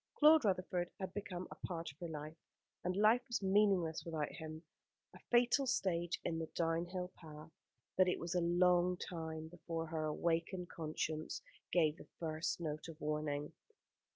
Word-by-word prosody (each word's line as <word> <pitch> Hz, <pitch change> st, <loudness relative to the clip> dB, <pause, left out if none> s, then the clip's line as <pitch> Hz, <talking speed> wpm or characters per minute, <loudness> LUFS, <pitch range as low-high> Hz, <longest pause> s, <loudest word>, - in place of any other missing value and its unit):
Claude 305 Hz, -3 st, +7 dB
Rutherford 185 Hz, -2 st, +1 dB
had 190 Hz, -1 st, -4 dB
become 185 Hz, -3 st, -4 dB
a -, -, -6 dB
part 170 Hz, -4 st, -4 dB
of 135 Hz, -, -24 dB
her 175 Hz, -, -4 dB
life, 155 Hz, 0 st, -6 dB, 0.5 s
and 180 Hz, +1 st, 0 dB
life 215 Hz, +4 st, +5 dB
was 235 Hz, -4 st, -1 dB
meaningless 190 Hz, -4 st, +3 dB
without 160 Hz, -3 st, -2 dB
him: 155 Hz, 0 st, -7 dB, 0.5 s
a -, -, -12 dB
fatal 245 Hz, +3 st, +4 dB
stage 175 Hz, -7 st, +1 dB
in 165 Hz, -, -1 dB
the 160 Hz, -, -3 dB
downhill 175 Hz, +2 st, -1 dB
path, 155 Hz, -1 st, -11 dB, 0.4 s
but 185 Hz, 0 st, +5 dB
it 180 Hz, -, +2 dB
was 170 Hz, 0 st, -3 dB
a 180 Hz, -, +2 dB
long 180 Hz, +1 st, +4 dB
time 160 Hz, -3 st, -5 dB
before 165 Hz, -1 st, -4 dB
her 160 Hz, -1 st, -2 dB
awakened 170 Hz, +3 st, 0 dB
conscience 155 Hz, -1 st, -3 dB, 0.3 s
gave 160 Hz, -3 st, +3 dB
the -, -, -12 dB
first 160 Hz, 0 st, -2 dB
note 155 Hz, -2 st, -3 dB
of 165 Hz, -1 st, -9 dB
warning. 150 Hz, -1 st, -2 dB
170 Hz, 160 wpm, -37 LUFS, 160-185 Hz, 0.5 s, Claude